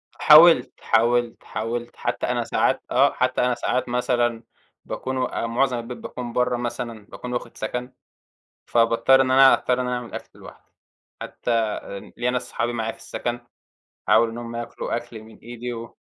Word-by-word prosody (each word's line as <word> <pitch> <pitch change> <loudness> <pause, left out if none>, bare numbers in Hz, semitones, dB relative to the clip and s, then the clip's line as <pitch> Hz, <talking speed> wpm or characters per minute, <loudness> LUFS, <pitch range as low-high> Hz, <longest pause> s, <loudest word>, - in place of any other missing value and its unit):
حاولت، 155 -4 +7
حاولت، 120 +1 +1
حاولت، 120 +2 -4
حتى - - -2
أنا - - 0
ساعات - - +1
آه، - - +4
حتى - - 0
أنا 125 0 +2
ساعات 125 +1 -1
مثلًا، 120 -1 0 0.4
باكون 130 0 -4
و 130 - 0 0.2
معظم 125 +2 +1
البيت 120 +1 -7
باكون 120 -2 -7
برّا 125 0 +1
مثلًا، 120 -2 -5
باكون 125 +4 -8
واخد 120 - -5
سكن، 125 +1 -4 0.7
فباضطر 115 +3 +4
إن 130 -1 +1
أنا، 135 0 +7
أضطر 125 0 +1
إني 125 - -2
أعمل 125 -1 -4
أكل - - -9
لوحدي، - - -15 0.5
حتى 115 -3 -1 0.4
ليَّ 120 +1 0
ناس 125 - -3
صحابي 120 0 -2
معايا 115 -1 -2
في - - -17
السكن، 120 0 -4 0.7
أحاول 115 - +5
إنهم 115 0 -7
ياكلوا 120 0 -4
أكل 120 -2 -8
من 110 0 -16
إيدي 120 +1 -7
و 115 0 -9
120 Hz, 160 wpm, -23 LUFS, 115-125 Hz, 0.7 s, حاولت